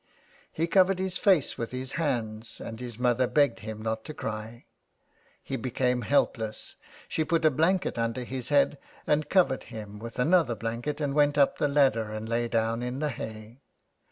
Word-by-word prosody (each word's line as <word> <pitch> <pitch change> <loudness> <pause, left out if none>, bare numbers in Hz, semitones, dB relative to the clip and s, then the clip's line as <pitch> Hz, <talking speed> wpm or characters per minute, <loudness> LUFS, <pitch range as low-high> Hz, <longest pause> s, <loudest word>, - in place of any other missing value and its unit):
He 165 - 0
covered 185 +2 +4
his 190 0 -2
face 190 - +3
with 115 - -2
his 130 +1 -5
hands 115 -8 -2
and 115 0 -7
his 120 -3 -7
mother 125 0 +2
begged 145 -5 +2
him 110 0 -7
not 110 0 -3
to 155 - -7
cry. 110 +2 -6 0.8
He 135 - -3
became 125 -1 0
helpless, 110 -3 0 0.3
she 160 - 0
put 165 +1 +1
a 155 - +6
blanket 165 0 +1
under 115 +2 -1
his 130 0 -5
head 145 -1 +3 0.3
and 150 0 +1
covered 180 -9 +3
him 105 -3 -8
with 115 +1 -8
another 150 -2 +3
blanket, 115 +7 -3
and 140 -2 0
went 145 0 +3
up 140 -1 +3
the - - +3
ladder 135 -6 +3
and 110 +1 -5
lay 120 +1 0
down 115 0 0
in 125 +1 -3
the 150 +1 -1
hay. 110 0 -8
125 Hz, 180 wpm, -28 LUFS, 115-150 Hz, 0.8 s, a